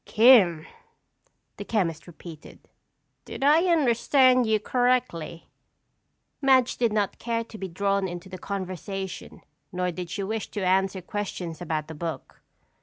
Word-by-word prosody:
"'Kim,'" 210 -9 +5 0.9
the - - -6
chemist 170 -8 -2
repeated. 165 -2 -13 0.6
"Did - - -7
I 305 +5 +5
understand 255 -4 +3
you 220 -1 +2
correctly?" 245 -9 -1 0.9
Madge 260 -2 +3
did 235 -3 +1
not 210 -2 -1
care 230 -1 -2
to 230 -1 -12
be 190 - -4
drawn 195 +2 -1
into 175 +1 -8
the 185 -1 -9
conversation 190 -1 -6 0.3
nor 180 -1 -2
did 175 0 -7
she 200 - -4
wish 220 +2 -4
to 200 -3 -4
answer 190 0 +1
questions 180 -4 -5
about 155 -3 -3
the 160 - -8
book. 160 -3 -7
195 Hz, 135 wpm, -25 LUFS, 175-235 Hz, 0.9 s, Kim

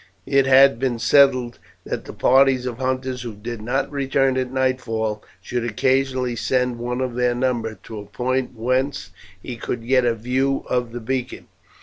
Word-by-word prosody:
It 135 -1 +2
had 135 -2 +6
been 130 -2 0
settled 130 -1 +3 0.3
that - - -4
the - - -8
parties 130 -1 +3
of 125 -1 -5
hunters 130 -1 -2
who 120 -3 -6
did 110 +2 -7
not 125 +7 -1
return 135 -1 +1
at 130 -1 -2
nightfall 115 -5 -1 0.2
should 120 +3 -3
occasionally 130 +2 0
send 125 0 0
one 125 +1 -3
of 130 -2 -2
their 125 0 +1
number 120 -3 -1
to 110 -2 -8
a 105 - -9
point 125 +4 -2
whence 130 +4 -1 0.3
he 120 - -6
could 115 0 -5
get 130 0 +4
a 120 -1 +1
view 130 +4 -1
of 125 -2 -1
the 120 +1 -6
beacon. 125 +2 -4
125 Hz, 175 wpm, -22 LUFS, 120-130 Hz, 0.3 s, had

